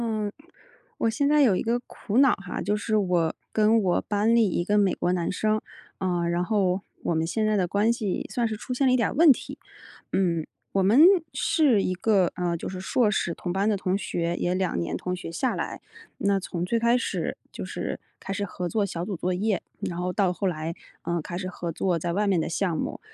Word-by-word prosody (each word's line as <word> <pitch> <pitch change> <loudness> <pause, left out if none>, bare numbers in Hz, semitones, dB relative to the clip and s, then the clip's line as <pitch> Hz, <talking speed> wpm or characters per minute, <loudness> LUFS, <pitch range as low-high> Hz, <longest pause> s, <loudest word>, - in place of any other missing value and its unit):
嗯， 215 -3 -1 0.7
我 - - +1
现 280 +5 +1
在 300 0 +5
有 220 -8 +4
一 - - -1
个 235 +2 0
苦 215 +2 -4
恼 270 -1 +6
哈。 195 -2 -5
就 205 +2 0
是 215 +1 0
我 180 -5 +1 0.2
跟 220 +1 +4
我 180 -2 +2
班 210 +3 +1
里 225 -4 +4
一 175 - 0
个 205 +4 0
美 195 -2 +3
国 180 - 0
男 175 -2 -1
生， 215 +3 0 0.4
呃， 175 -2 0
然 175 +1 0
后 190 -2 +1 0.2
我 - - 0
们 160 0 +1
现 215 +5 0
在 215 0 +2
的 185 -3 +1
关 205 +5 +2
系 210 -5 -2
算 240 -2 0
是 220 -1 -4
出 250 - -5
现 265 +2 +2
了 - - +4
一 - - +5
点 235 - +2
儿 - - -5
问 315 +2 +7
题。 255 - -3 0.5
嗯， 170 -4 +1 0.2
我 195 - +1
们 210 +9 +5 0.3
是 270 - +3
一 185 - 0
个， 185 -1 +2
呃， 175 -1 -1
就 - - -6
是 185 - -5
硕 215 +3 +2
士 170 -4 -1
同 175 - -4
班 195 +3 +1
的 210 - +1
同 185 0 0
学， 170 -3 -2
也 180 +1 0
2 185 - 0
年 85 - -2
同 180 0 -3
学 175 -2 -7
下 250 +9 -1
来。 - - -4 0.4
那 200 -1 +1
从 175 -2 -4
最 230 +5 0
开 235 +1 +3
始 - - -2
就 - - -6
是 - - -4 0.2
开 195 - -5
始 205 0 -2
合 180 -2 -4
作 215 +3 0
小 175 -3 -3
组 200 -1 -3
作 180 +2 -1
业， 205 0 0 0.2
然 175 - -3
后 180 0 -1
到 185 -1 +1
后 195 +2 -1
来， 165 -2 -2 0.3
呃， 170 -1 -1
开 175 +3 -6
始 185 0 -4
合 175 -2 -5
作 175 +1 0
在 170 +1 -2
外 210 +3 +1
面 195 -4 +2
的 - - -3
项 175 0 0
目， - - -3
195 Hz, 250 characters per minute, -26 LUFS, 175-215 Hz, 0.7 s, 问